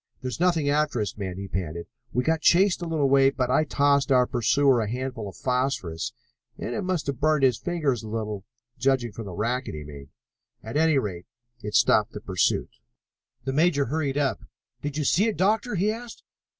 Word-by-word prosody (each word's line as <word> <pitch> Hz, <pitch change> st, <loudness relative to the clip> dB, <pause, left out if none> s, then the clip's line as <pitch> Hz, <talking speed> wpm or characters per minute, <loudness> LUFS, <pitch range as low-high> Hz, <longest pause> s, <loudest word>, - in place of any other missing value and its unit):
"There's 125 Hz, -3 st, -4 dB
nothing 170 Hz, -5 st, +2 dB
after 150 Hz, -3 st, +1 dB
us, 105 Hz, -3 st, -2 dB
men," 95 Hz, -3 st, -5 dB
he 100 Hz, 0 st, -5 dB
panted. 85 Hz, -3 st, -4 dB, 0.3 s
"We 125 Hz, -, 0 dB
got 160 Hz, +2 st, +1 dB
chased 185 Hz, +2 st, +4 dB
a 170 Hz, -, -3 dB
little 155 Hz, -4 st, +1 dB
way, 135 Hz, 0 st, +5 dB
but 125 Hz, -2 st, -1 dB
I 155 Hz, +4 st, +3 dB
tossed 140 Hz, -1 st, +2 dB
our 125 Hz, -1 st, +5 dB
pursuer 125 Hz, +1 st, +3 dB
a 105 Hz, -, -2 dB
handful 125 Hz, -3 st, -4 dB
of -, -, -13 dB
phosphorus 125 Hz, -8 st, -1 dB, 0.5 s
and -, -, -4 dB
it -, -, -2 dB
must 185 Hz, -4 st, -1 dB
have 140 Hz, -3 st, -3 dB
burned 155 Hz, -1 st, +2 dB
his 125 Hz, -3 st, +3 dB
fingers 150 Hz, -6 st, -1 dB
a 110 Hz, -, -9 dB
little, 105 Hz, -3 st, -4 dB, 0.4 s
judging 130 Hz, -3 st, +1 dB
from 110 Hz, +2 st, -8 dB
the 95 Hz, -, -7 dB
racket 120 Hz, -, -2 dB
he 75 Hz, -, -6 dB
made. 70 Hz, -2 st, -11 dB, 0.5 s
At 110 Hz, -, -7 dB
any 160 Hz, -1 st, +3 dB
rate, 95 Hz, -8 st, -3 dB, 0.3 s
it 105 Hz, -1 st, -5 dB
stopped 110 Hz, -2 st, +4 dB
the -, -, -6 dB
pursuit." 95 Hz, -4 st, 0 dB, 0.7 s
The 135 Hz, -, -2 dB
major 150 Hz, -1 st, +3 dB
hurried 145 Hz, +1 st, -1 dB
up. 140 Hz, -2 st, 0 dB, 0.4 s
"Did 145 Hz, 0 st, -4 dB
you 150 Hz, -, 0 dB
see 195 Hz, +9 st, +3 dB
it, 220 Hz, -, -2 dB
Doctor?" 215 Hz, +5 st, +1 dB
he 200 Hz, +4 st, +2 dB
asked. 235 Hz, +1 st, -8 dB
135 Hz, 200 wpm, -25 LUFS, 110-155 Hz, 0.7 s, way